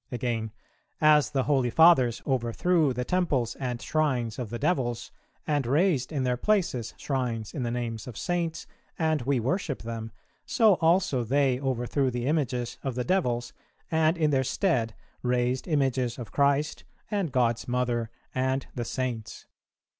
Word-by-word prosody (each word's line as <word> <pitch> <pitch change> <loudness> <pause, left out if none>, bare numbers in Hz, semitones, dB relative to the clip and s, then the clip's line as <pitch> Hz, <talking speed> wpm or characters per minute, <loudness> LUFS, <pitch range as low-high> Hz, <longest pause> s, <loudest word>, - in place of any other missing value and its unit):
"[376:1] - - -10
Again, 115 -2 -2 0.5
"As 150 -1 +5
the 135 -3 0
holy 135 -4 +2
Fathers 130 -5 +5
overthrew 135 +5 +1
the 125 0 -3
temples 140 -10 0
and 125 -2 -3
shrines 130 -8 -1
of 120 -4 -4
the 120 - -4
devils, 120 -4 -1 0.3
and 145 -5 0
raised 150 -1 +2
in 140 -4 -1
their 125 -1 0
places 170 - 0
shrines 120 -6 -2
in 140 - -4
the 120 - -1
names 115 -2 -4
of 120 -5 -8
Saints 170 -2 -2 0.3
and 160 -2 +1
we 135 +1 +1
worship 140 - -2
them, 115 -1 -5 0.3
so 220 -4 +4
also 165 -6 +3
they 130 +1 +2
overthrew 130 0 0
the 120 -1 -3
images 130 -5 -1
of 135 -3 -3
the 125 - -1
devils, 125 -11 0 0.4
and 160 +1 +3
in 155 -2 +2
their 135 -2 +2
stead 125 - 0 0.3
raised 125 +1 0
images 130 -6 0
of 120 -4 -8
Christ, 140 +1 +1 0.3
and 200 -7 -1
God's 120 -3 +1
Mother, 120 -2 0 0.2
and 130 +1 0
the 120 -2 -3
Saints. 120 -3 -4
130 Hz, 155 wpm, -27 LUFS, 120-150 Hz, 0.5 s, As